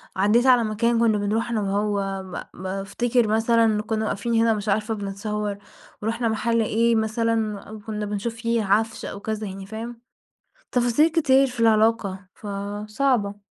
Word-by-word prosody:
عدّيت 210 Hz, +6 st, +3 dB
على 250 Hz, -2 st, +6 dB
مكان 230 Hz, +2 st, +1 dB
كنا 225 Hz, -2 st, +3 dB
بنروحه 210 Hz, +3 st, -1 dB
أنا 220 Hz, -2 st, 0 dB
وهو 200 Hz, -1 st, -1 dB, 0.3 s
ب -, -, -12 dB
بافتكر 200 Hz, +5 st, 0 dB
مثلًا 225 Hz, 0 st, +3 dB
كنا 220 Hz, 0 st, -2 dB
واقفين 215 Hz, +3 st, -2 dB
هنا 225 Hz, 0 st, +4 dB
مش 210 Hz, 0 st, -3 dB
عارفة 215 Hz, +2 st, 0 dB
بنتصور 205 Hz, 0 st, -3 dB, 0.4 s
ورُحنا 230 Hz, +2 st, -1 dB
محل 230 Hz, +1 st, +1 dB
إيه 230 Hz, +2 st, +2 dB
مثلًا 220 Hz, -1 st, 0 dB
أو 215 Hz, +2 st, -10 dB
كنا 210 Hz, 0 st, -4 dB
بنشوف 210 Hz, +3 st, -3 dB
فيه 230 Hz, -1 st, 0 dB
عفش 220 Hz, +3 st, +1 dB
أو 200 Hz, -, -6 dB
كذا 215 Hz, 0 st, -4 dB
يعني، 195 Hz, 0 st, -7 dB
فاهم؟ 230 Hz, +3 st, -7 dB, 0.7 s
تفاصيل 245 Hz, +6 st, +3 dB
كتير 275 Hz, -5 st, +4 dB
في 250 Hz, -2 st, -8 dB
العلاقة، 215 Hz, -4 st, +2 dB
فصعبة. 205 Hz, +2 st, -2 dB
220 Hz, 150 wpm, -24 LUFS, 205-230 Hz, 0.7 s, على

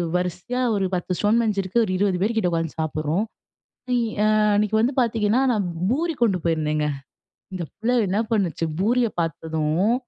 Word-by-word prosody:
வரிசையா 180 Hz, +8 st, -2 dB
ஒரு 195 Hz, -1 st, 0 dB
10 180 Hz, +1 st, -3 dB
stone 215 Hz, +3 st, +3 dB
bench 215 Hz, -3 st, 0 dB
இருக்கு, 195 Hz, +5 st, +1 dB
ஒரு 185 Hz, -, -3 dB
20 190 Hz, -2 st, +1 dB
பேர் 220 Hz, +4 st, +1 dB
கிட்ட 190 Hz, -5 st, +2 dB
உட்காந்து 165 Hz, -1 st, -2 dB
சாப்பிடுறோம். 155 Hz, +5 st, -1 dB, 1.0 s
ஆ -, -, +4 dB, 0.3 s
அன்னைக்கு 210 Hz, +1 st, +1 dB
வந்து 240 Hz, +5 st, +2 dB
பாத்தீங்கன்னா, 225 Hz, 0 st, +2 dB
நான் 205 Hz, -5 st, 0 dB, 0.2 s
பூரி 325 Hz, +6 st, 0 dB
கொண்டு 195 Hz, -6 st, +3 dB
போயிருந்தேங்க, 155 Hz, -2 st, 0 dB, 0.7 s
இந்த 180 Hz, -2 st, -3 dB
பிள்ளை 245 Hz, +3 st, 0 dB
என்ன 195 Hz, +3 st, 0 dB
பண்ணுச்சு 180 Hz, -7 st, 0 dB
பூரியை 235 Hz, +4 st, +2 dB
பாத்ததும் 160 Hz, +4 st, 0 dB
195 Hz, 155 wpm, -23 LUFS, 165-225 Hz, 1.0 s, ஆ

